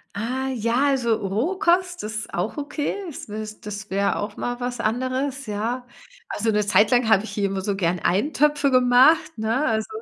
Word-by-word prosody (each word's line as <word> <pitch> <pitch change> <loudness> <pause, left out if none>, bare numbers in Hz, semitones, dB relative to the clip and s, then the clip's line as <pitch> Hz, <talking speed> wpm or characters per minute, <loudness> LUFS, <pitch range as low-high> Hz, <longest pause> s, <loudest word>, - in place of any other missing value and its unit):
Ah, 255 +5 -2
ja, 240 +4 +1
also, 240 -4 +2
Rohkost 350 - 0
ist 220 +1 -5
auch 180 - -2
okay. 290 0 -3
Das 300 -8 -8
wes 215 0 -7
das 210 0 -7
wär 200 +1 0
auch 205 0 -5
mal 245 0 -3
was 245 -1 -4
anderes, 255 +3 -2
ja. 230 +5 -3 0.4
Also, 220 +1 0
'ne 210 0 +2
Zeit 210 +3 +4
lang 245 -2 +3
habe 200 -2 +4
ich 225 - -7
hier 205 -1 -1
immer 195 -1 -2
so 200 +1 -1
gern 180 -2 0
Eintöpfe 290 - +2
gemacht, 255 +6 +4
ne? 225 +7 0
Also, 220 -3 0
230 Hz, 180 wpm, -23 LUFS, 210-265 Hz, 0.4 s, Zeit